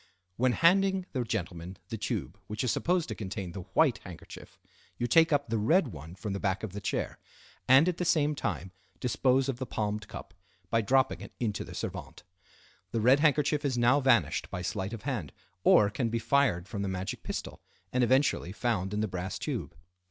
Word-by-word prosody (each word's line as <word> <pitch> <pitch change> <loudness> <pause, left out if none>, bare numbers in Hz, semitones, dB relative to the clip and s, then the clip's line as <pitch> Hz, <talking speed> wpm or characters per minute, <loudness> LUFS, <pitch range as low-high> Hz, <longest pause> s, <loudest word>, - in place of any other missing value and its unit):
When 125 +3 +2
handing 190 +3 +3
the 130 -3 -1
gentleman 90 -5 -4
the - - -3
tube - - -3
which 105 +2 -3
is 125 - +1
supposed 175 -1 +1
to - - -2
contain 95 -3 -5
the 95 - -6
white 150 -7 +4
handkerchief, 90 -3 -11 0.4
you 120 - -1
take 160 +7 +5
up 145 -1 +2
the 115 -1 0
red 155 - +3
one 80 -1 -9
from 95 +2 -4
the 100 - -3
back 95 0 -1
of 105 -4 -5
the 105 - -5
chair, - - -2 0.5
and 135 +6 +7
at 180 -2 0
the - - -1
same 150 -3 +2
time 95 -9 -3 0.3
dispose 130 +1 +2
of 130 -3 -2
the 130 - -4
palmed 105 -1 -2
cup - - -9 0.4
by 115 - +3
dropping 130 -4 +2
it 100 - -10
into 110 -4 -1
the - - -10
servante. - - -6 0.7
The 115 - -1
red 125 +5 +5
handkerchief 150 0 +2
is 135 -4 0
now 120 +4 +4
vanished 130 -5 +2
by 90 - -5
sleight 95 +2 -3
of 115 - -7
hand, 115 - -3 0.3
or 105 -1 +6
can 115 +2 -1
be 115 - -1
fired 115 -8 +2
from 100 -1 -4
the 100 - -1
magic 95 0 -4
pistol, - - -5 0.3
and 125 0 +3
eventually 130 -7 +2
found 105 -3 -1
in 105 - 0
the 110 - 0
brass 90 0 -4
tube. - - -4
115 Hz, 200 wpm, -30 LUFS, 100-135 Hz, 0.7 s, and